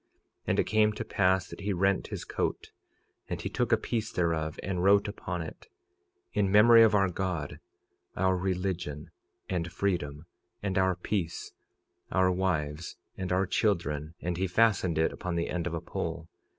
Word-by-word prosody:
46:12 - - -46 0.4
And - - +2
it - - +5
came 110 0 +3
to - - -5
pass 95 -1 +2
that - - -10
he 100 0 -1
rent 95 +1 +1
his - - -6
coat; - - -3 0.6
and - - -3
he - - -3
took - - -1
a - - +6
piece 110 -2 -2
thereof, 80 -3 -1
and 90 -2 -2
wrote 100 +2 +5
upon 90 -4 -4
it—In 370 - -6
memory 115 +3 +8
of 110 -2 +6
our 95 -1 +4
God, 90 -5 -3 0.6
our 95 0 +2
religion, 90 -5 -3 0.4
and 85 -2 -2
freedom, 85 -5 -2 0.4
and 95 -2 0
our 95 -1 +2
peace, 90 -1 -3 0.6
our 95 -1 +3
wives, 85 -4 -2 0.2
and 95 -1 -4
our 95 +1 +2
children—and 85 -4 -1
he 95 +1 0
fastened 90 -4 +2
it 80 - +2
upon 90 -1 -4
the 85 0 -1
end 90 -1 -2
of 85 - -3
a 85 - -3
pole. 80 0 -4
90 Hz, 165 wpm, -29 LUFS, 85-100 Hz, 0.6 s, memory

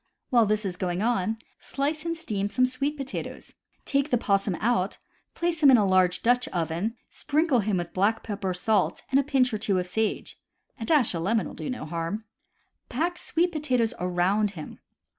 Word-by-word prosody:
While 235 -4 +5
this 215 0 0
is 180 -2 -3
going 180 +1 -1
on, 225 -2 +1 0.2
slice 300 +3 -2
and 335 0 -2
steam 205 -10 -2
some 255 +4 +3
sweet 275 +4 -2
potatoes. 275 0 -6 0.3
Take 280 +1 +1
the 245 - +3
possum 195 -3 +1
out, 210 -2 0 0.4
place 340 -2 -1
him 285 - +8
in 255 - +8
a 210 - +3
large 185 -1 +3
Dutch 245 +1 +3
oven, 170 +6 -2 0.2
sprinkle 300 -3 +1
him 210 -2 0
with 175 -1 -4
black 205 +4 +1
pepper, 200 -3 -3
salt, 205 +4 0
and 270 - +5
a - - +2
pinch 260 -3 +2
or 215 - -1
two 200 -2 +1
of 180 - 0
sage. 220 +4 -2 0.4
A 225 - -4
dash 275 -6 +3
of 165 - -2
lemon 220 +6 +1
will - - -7
do - - -6
no 250 -11 -4
harm. 170 +6 -3 0.7
Pack 340 +7 -1
sweet 350 +2 +1
potatoes 255 -7 0
around 180 +4 +1
him. 155 - -8
220 Hz, 190 wpm, -26 LUFS, 190-270 Hz, 0.7 s, him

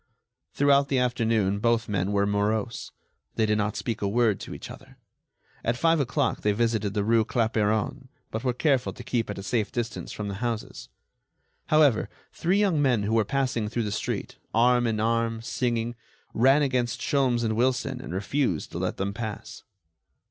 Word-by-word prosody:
Throughout 140 0 +4
the 135 - +1
afternoon 115 -5 +1
both 115 +1 +1
men 100 -1 -1
were 100 0 +2
morose. 105 +2 -1 0.4
They 110 - +2
did 105 0 +1
not 105 0 -1
speak 115 -3 -3
a 100 - +1
word 110 -1 +2
to - - -7
each - - -9
other. - - -13 0.7
At 115 +1 0
five 165 +3 +3
o'clock 125 -4 0
they 105 - +2
visited 110 -2 0
the 105 - +1
rue 115 +1 +3
Clapeyron, 110 -2 0 0.2
but 110 +2 -4
were 125 - +2
careful 135 0 +1
to 120 - -10
keep 115 -2 -1
at 105 - -4
a 95 - -6
safe 110 0 -1
distance 120 -1 -4
from 105 - -5
the 100 +2 -5
houses. 115 -2 -5 0.8
However, 150 -7 +4 0.2
three 180 +4 +1
young 195 -7 +2
men 125 -7 +2
who 105 +2 -1
were 115 -1 +4
passing 125 -2 -1
through 120 +1 -1
the 105 - -3
street, 105 - -3 0.2
arm 120 +1 +4
in 110 -2 -1
arm, 115 0 0
singing, 120 -1 -1 0.4
ran 135 +5 +4
against 125 -2 0
Sholmes 130 -5 +1
and 110 -1 0
Wilson 130 +2 0
and - - -8
refused 100 - -1
to - - -5
let - - -2
them 100 +1 -2
pass. 110 -1 -6
115 Hz, 180 wpm, -26 LUFS, 105-125 Hz, 0.8 s, Throughout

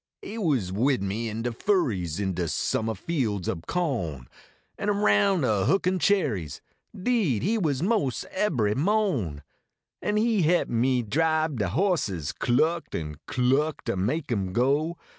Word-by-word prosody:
lie 215 - -7
was 140 - 0
wid 125 +3 +1
me 110 +4 -2
in 110 +1 -4
de 120 - -1
furries 110 - 0
In 95 -2 -1
de 85 -1 -2
suminah 110 +7 -1
fields 110 - -2
ob 85 -3 -4
co 135 - -1
n, 60 -2 -14 0.5
An 205 - -1
aroun" 195 - +3
a 105 -6 +1
hookiif 185 -1 +2
cherries 115 - +1 0.4
Deed 185 - +1
he 210 +7 +1
was, 150 -5 0
mos 190 - 0
ebbery 125 - +1
nio 195 - +1
n, 70 -1 -9 0.6
An 210 0 0
he 220 -2 +2
he 175 +2 +3
p - - -11
me 125 +1 +2
dribe 155 +3 +1
de 100 - +1
horses, 115 - 0
Cluckt 155 - 0
an 75 -2 -7
cluckt 135 +5 +1
ter - - -1
make 125 - -1
em 95 -5 -1
go. 145 - +1
130 Hz, 160 wpm, -26 LUFS, -, 0.6 s, aroun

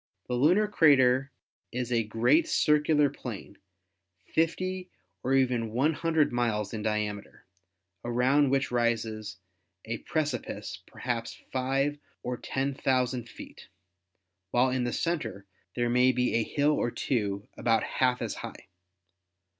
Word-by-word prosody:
The 125 - -3
lunar 170 +12 +4
crater 140 -8 +4 0.4
is 125 0 -3
a 115 -1 +3
great 120 +9 +2
circular 150 0 +3
plane, 120 -7 -8 0.7
50 185 +3 0 0.3
or 135 +1 +1
even 125 -4 +2
100 155 +4 +1
miles 110 -4 0
in 110 - -3
diameter, 105 -1 -3 0.6
around 130 +4 +3
which 135 -1 +1
rises 110 -4 -1 0.5
a 115 0 -4
precipice 155 -1 -3
perhaps 115 -2 -4
five 135 +3 0 0.2
or 125 - -2
ten 135 +3 -2
thou 130 -1 +3
sand 120 -1 -5
feet, - - -12 0.8
while 125 +5 +3
in 130 -1 0
the 120 - -1
center 120 - -2 0.3
there 120 -1 +1
may 125 +2 +4
be 125 0 0
a 115 - +3
hill 145 +6 +1
or 120 - +1
two 105 -5 -2
about 115 -1 +2
half 125 -1 0
as 110 - -3
high'. - - -9
125 Hz, 130 wpm, -28 LUFS, 115-145 Hz, 0.8 s, lunar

